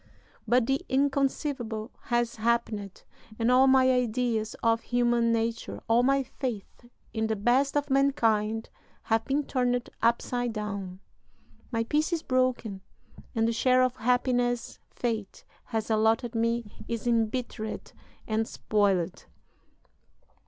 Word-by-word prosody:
But 245 +1 +3
the 270 +2 0
inconceivable 270 -4 0
has 240 -1 0
happened, 220 -3 -1 0.3
and 230 +1 +2
all 260 +1 +6
my 260 -1 +5
ideas 240 -3 0
of 230 0 +3
human 240 -1 +2
nature, 230 0 -2
all 230 +1 +4
my 275 +2 +3
faith 240 -2 -6 0.2
in 220 0 0
the 220 - 0
best 250 +7 +2
of 290 -1 -1
mankind, 225 -6 +1 0.3
have 225 0 +1
been 285 +2 0
turned 245 -2 0
upside 240 +1 +1
down. 200 -3 -5 0.7
My 230 -1 0
peace 300 +7 0
is 335 -2 -1
broken, 255 -6 0 0.5
and 225 0 +2
the 230 - +1
share 255 +2 +3
of 255 0 0
happiness 245 0 0
fate 220 -5 -4 0.2
has 225 -1 -3
allotted 225 +2 +2
me 230 -1 -2
is 230 -1 -4
embittered 230 -1 -1 0.4
and 220 0 0
spoiled." 195 -4 0
235 Hz, 125 wpm, -28 LUFS, 220-255 Hz, 0.7 s, all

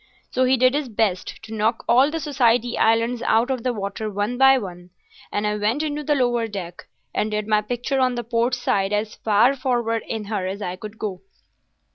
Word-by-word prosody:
So 255 0 +2
he 260 +1 +3
did 255 +1 +4
his 290 -3 -1
best 205 -2 -1
to 225 0 -9
knock 220 +2 0
all 255 +4 +5
the 325 +1 -3
Society 245 -5 +1
Islands 230 +2 +2
out 235 +3 +2
of 255 -2 -2
the 250 - 0
water 210 0 -4
one 205 +4 -2
by 270 +1 +6
one, 180 -5 -7 0.4
and 205 - -1
I 210 0 0
went 220 +8 0
into 300 -1 -3
the 295 +1 +1
lower 240 -3 +1
deck, 180 -5 -7 0.3
and 215 - 0
did 210 0 -2
my 215 -1 +3
picture 245 +5 -2
on 255 -1 +2
the 240 - -3
port 235 +2 0
side 200 -5 0
as 210 +1 -1
far 220 +5 +3
forward 240 -4 0
in 220 -2 -3
her 200 -3 -2
as 195 +2 -4
I 180 -3 -4
could 210 +3 -9
go. 195 -4 -4
230 Hz, 210 wpm, -22 LUFS, 210-255 Hz, 0.4 s, by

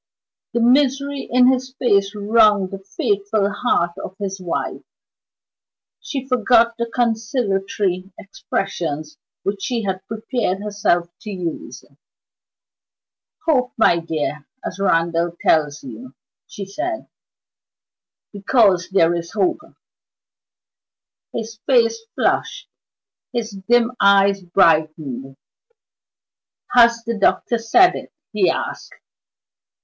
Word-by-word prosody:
The 235 - +1
misery 275 +3 +2
in 250 +1 +5
his 260 0 -2
face 200 -3 +2
wrung 210 -2 +3
the 195 - -6
faithful 205 - -1
heart 205 -5 0
of 185 - -8
his 195 -2 -5
wife. 175 -2 -3 1.2
She 270 -3 -5
forgot 235 -2 +3
the 235 - -1
conciliatory 210 -5 -1
expressions 160 -6 -4 0.2
which 200 0 -3
she 230 +3 -2
had 190 -1 -3
prepared 220 -3 -2
herself 200 -5 0
to 215 - -9
use. 180 -5 -6 1.6
"Hope, 255 -6 +1
my 175 -6 +4
dear, 155 -3 -4 0.2
as - - -5
Randal 170 -2 +1
tells 150 -1 +1
you," 125 +1 -10 0.3
she 200 - -7
said, 330 - -4 1.3
"because 200 -3 +2
there 175 -3 +3
is 170 -1 -5
hope." 195 +1 +1 1.7
His 225 -1 -6
face 230 -4 +3 0.2
flushed, - - -1 0.6
his 235 -2 -3
dim 230 +5 +1
eyes 200 0 +4
brightened. 155 -7 +1 1.4
"Has 235 -1 +5
the 230 -2 -3
doctor 235 +3 +2
said 350 +12 +5
it?" - - -8 0.2
he - - +3
asked. - - -4
200 Hz, 105 wpm, -20 LUFS, 180-235 Hz, 1.7 s, in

